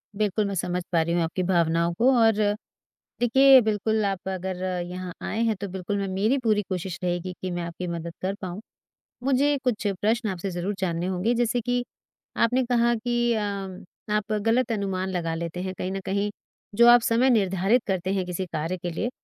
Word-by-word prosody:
बिल्कुल, 210 0 0
मैं 200 - -3
समझ 180 0 -2
पा 165 -2 +3
रही 170 +1 -1
हूँ 175 - +2
आपकी 175 +3 -2
भावनाओं 170 -1 +2
को 250 +3 +4
और 225 -1 +5 0.9
देखिए 265 +2 +7
बिल्कुल 215 0 0
आप 195 -2 -3
अगर 185 0 -4 0.2
यहाँ 180 0 -6
आए 220 - -2
हैं 220 - +1
तो 200 - -2
बिल्कुल 190 +2 -3
मैं 200 -1 -2
मेरी 205 +8 +1
पूरी 215 -2 +3
कोशिश 180 -2 -4
रहेगी 175 +1 -2
कि 185 -1 -3
मैं 175 0 -3
आपकी 170 +1 -5
मदद 170 0 -5
कर 190 - 0
पाऊँ। 185 +1 -5 0.6
मुझे 280 +2 +2
कुछ 225 -5 0
प्रश्न 220 +1 +1
आपसे 185 +1 -4
ज़रूर 175 +4 -2
जानने 175 -1 -1
होंगे 190 +5 0
जैसे 240 0 +1
कि 245 +1 0 0.6
आपने 255 +3 +1
कहा 240 -1 +2
कि 240 +1 0
अ, 220 - 0 0.7
आप 210 +1 0
ग़लत 225 +4 +1
अनुमान 190 -2 -2
लगा 170 -3 -2
लेते 170 +1 -4
हैं 185 0 -3
कहीं 185 - -3
न 195 - -3
कहीं। 200 +1 0 0.5
जो 235 +2 +6
आप 240 0 +8
समय 235 +3 +3
निर्धारित 200 +1 +2
करते 190 -1 -1
हैं 190 -2 -1
किसी 180 +1 -3
कार्य 165 +4 -2
के 175 0 -4
लिए 220 +8 -2
195 Hz, 195 wpm, -25 LUFS, 180-230 Hz, 0.9 s, आप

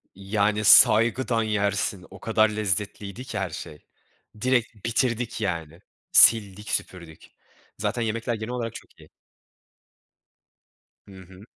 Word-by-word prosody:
Yani 105 +2 -1
saygıdan 115 +2 +5
yersin 100 -2 -2
o 95 0 -13
kadar 110 -1 +2
lezzetliydi 105 +1 -3
ki 110 - -6
her 95 -2 -3
şey. 75 -1 -10 0.6
Direkt 120 -4 -1
bitirdik 120 -1 -1
yani. 85 -3 -4 0.3
Sildik 105 -2 +4
süpürdük. 85 -4 -5 0.5
Zaten 120 - -2
yemekler 115 +1 -2
genel 110 +2 -6
olarak 115 -2 -4
çok - - -13
iyi. - - -17 2.0
Hı 100 - -14
hı. 95 +2 -15
105 Hz, 115 wpm, -24 LUFS, 95-115 Hz, 2.0 s, saygıdan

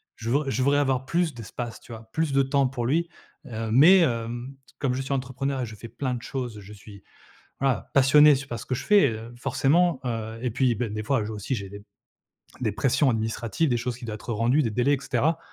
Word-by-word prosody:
Je 115 +1 -6
vr 140 +3 +1
je 130 -1 0
voudrais 145 +1 +3
avoir 130 -2 0
plus 170 +1 0
d'espace, 120 +1 -7
tu 120 - -15
vois? 110 0 -11
Plus 160 0 -1
de 135 - +4
temps 135 0 +2
pour 125 -2 -4
lui, 165 +6 +1 0.4
heu, 115 -1 -5
mais, 165 +10 +7
hem, 120 -2 -1 0.2
comme 135 -4 0
je 130 - -2
suis 135 +1 -3
entrepreneur 130 +1 -2
et - - -1
je 110 -1 -9
fais 115 - -10
plein 130 0 -3
de 120 - -6
choses, 125 -5 -5
je 100 +1 -12
suis, 100 -1 -14 0.6
voilà, 135 -2 0
passionné, 145 +2 +7
c 135 0 -4
par 120 -4 -5
ce 115 - -9
que 130 - -1
je - - -5
fais, 205 - +5
heu, 115 +2 -7
forcément, 155 +5 +2
heu, 115 -2 -4
et 125 - -1
puis, 120 +1 +1
ben, 110 0 -3
des 105 0 -3
fois 135 0 +1
aussi 105 +5 -3
j'ai 100 -4 -5
des 100 +1 -10 0.8
des 115 - 0
pressions 135 +6 +2
administratives, 115 +6 -1
des 120 - +1
choses 125 0 -3
qui 125 - -10
doient 110 -2 -5
être 110 +3 -8
rendues, 120 +7 +2
des 120 - 0
délais 125 +6 +1
et 135 - -4
cetera. 140 +5 0
125 Hz, 235 wpm, -25 LUFS, 115-140 Hz, 0.8 s, mais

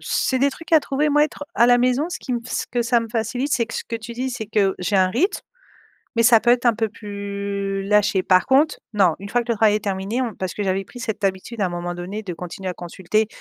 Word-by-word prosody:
c'est 260 - 0
des 280 +2 +3
trucs 330 +4 -12
à 315 - +7
trouver, 285 +2 0
moi 295 +1 +4
être 295 -1 -6
à 235 - +5
la 245 0 +5
maison 255 +6 +1
ce - - -4
qui 255 - -5
m 240 - -1
ce - - -3
que 240 -1 0
ça 235 0 +2
me 230 - -6
facilite 245 +5 -2
c'est 235 -3 +2
que 225 - -8
ce - - -3
que 230 - -4
tu 230 +1 -8
dis 255 +2 -3
c'est 220 -3 -5
que 200 -3 +1
j'ai 195 +2 0
un 185 -1 +4
rythme, 280 - 0 0.8
mais 230 - +4
ça 230 -1 +7
peut 240 - +3
être 245 0 +3
un 235 - +5
peu 225 0 -1
plus 200 -1 -4
lâché 205 -2 +3
par 185 -1 +3
contre 285 +4 +3 0.2
non 185 -6 +4
une 200 +1 -8
fois 240 +3 +1
que 235 - -6
le - - -2
travail 215 -1 +4
est 210 - -4
terminé 200 +5 -1
on 230 -4 -3
parce 185 -3 -4
que 205 - -3
j'avais 195 0 0
pris 245 - -12
cette 220 -5 -3
habitude 195 +4 -2
à 190 - +2
un - - -2
moment 175 0 -4
donné 190 +5 -5
de 185 -4 -5
continuer 180 +2 -6
à 180 - -3
consulter, 190 +5 -1
220 Hz, 275 wpm, -22 LUFS, 195-245 Hz, 0.8 s, à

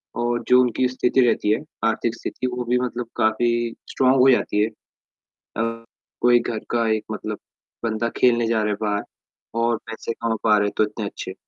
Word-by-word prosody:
और 120 0 -1
जो 125 0 +6
उनकी 125 +1 +1
स्थिति 130 +1 +1
रहती 115 -3 +2
है, 110 - +2 0.3
आर्थिक 115 +1 0
स्थिति 130 - -4
वो 125 0 -3
भी 125 +1 +2
मतलब 125 -1 -3
काफ़ी 110 +2 +2 0.4
स्ट्रॉन्ग 130 0 +3
हो 130 +1 +7
जाती 105 -3 +1
है। - - +2 0.9
अ 115 +1 -2 0.4
कोई 120 0 +5
घर 115 -2 -3
का 115 -1 +1
एक 110 - -2
मतलब 105 0 -4 0.5
बंदा 115 0 -1
खेलने 120 -2 +3
जा 115 -1 +1
रहा 105 - 0
है - - 0
बाहर 105 -1 0 0.6
और 115 -1 +2
पैसे 110 +1 -5
कमा 115 -1 -2
पा 105 -1 +5
रहे 105 0 +2
हैं - - -4
तो - - +4
इतने 105 0 -3
अच्छे 95 -2 -6
115 Hz, 195 wpm, -23 LUFS, 110-120 Hz, 0.9 s, हो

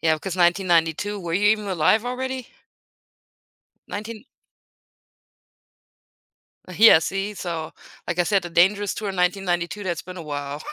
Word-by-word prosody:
Yeah, 160 -1 +3
because 170 +4 -5
1992 175 +2 +1
were 170 -1 -4
you 205 +2 +3
even 215 -1 +1
alive 195 +5 +2
already? 260 0 -4 1.4
19 215 +3 -7 2.5
Yeah, 220 -5 +8
see, 195 +4 -3
so, 165 -4 -5 0.4
like 175 0 -2
I 175 - +3
said, 195 -1 +1
the 175 - -7
Dangerous 195 +4 +3
tour 205 -2 -4
in 190 - -7
1992, 180 +1 -1
that's 175 -2 -3
been 185 0 -10
a 170 - -7
while. 145 -1 -5
185 Hz, 135 wpm, -23 LUFS, 170-205 Hz, 2.5 s, Yeah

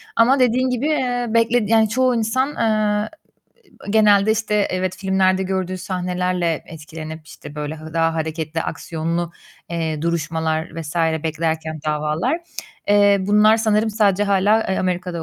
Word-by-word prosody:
Ama 255 +4 +4
dediğin 255 +1 +2
gibi, 250 +2 -1
eee, 250 -5 0
bekledi 230 -1 +2
yani, 220 -1 +4
çoğu 255 +2 +2
insan, 235 +4 0
eee, 215 -1 +1 0.8
genelde, 210 -1 +4
işte, 220 -1 -2 0.2
evet, 185 0 -2
filmlerde 190 -1 +1
gördüğü 185 -1 -2
sahnelerle 180 -2 -2
etkilenip, 160 0 -9
işte, 145 - -11
böyle, 150 +1 -5
hı 155 0 -11
daha 165 0 +1
hareketli, 160 0 -3
aksiyonlu, 165 +2 -3 0.4
eee, 160 -3 -2
duruşmalar 160 -1 -2
vs. 155 0 -7 0.3
beklerken, 160 -1 -2
davalar, 155 - 0 0.5
eee, 205 0 +5
bunlar 210 +3 +4
sanırım 220 -1 +1
sadece 205 -2 +2
hâlâ, 200 +2 +3
eee, 190 - 0
Amerika'da 180 -2 -2
185 Hz, 135 wpm, -20 LUFS, 160-220 Hz, 0.8 s, eee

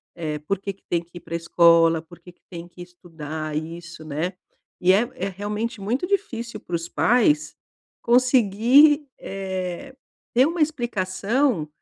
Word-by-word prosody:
É, 155 -3 -3
por 185 +6 -2
que 200 0 -5
que 195 - -33
tem 170 -1 +1
que 175 +1 -14
ir - - -25
pra 170 -1 -6
escola, 165 -1 +4
por 170 +1 -16
que 180 - -14
que - - -43
tem 170 -1 -8
que 175 0 -14
estudar 160 -4 -7
isso, 165 0 -7
né. 155 +5 -3 0.5
E 180 +1 +5
é 230 +5 +2
é 195 -5 -3
realmente 210 +4 -4
muito 245 - -1
difícil 235 - -2
pros 170 -3 -5
pais, 250 +6 +2 0.5
conseguir, 255 +4 +4
eh, 190 +6 -5 0.4
ter 255 +3 +5
uma 335 0 -2
explicação 235 - 0
190 Hz, 150 wpm, -23 LUFS, 170-240 Hz, 0.5 s, E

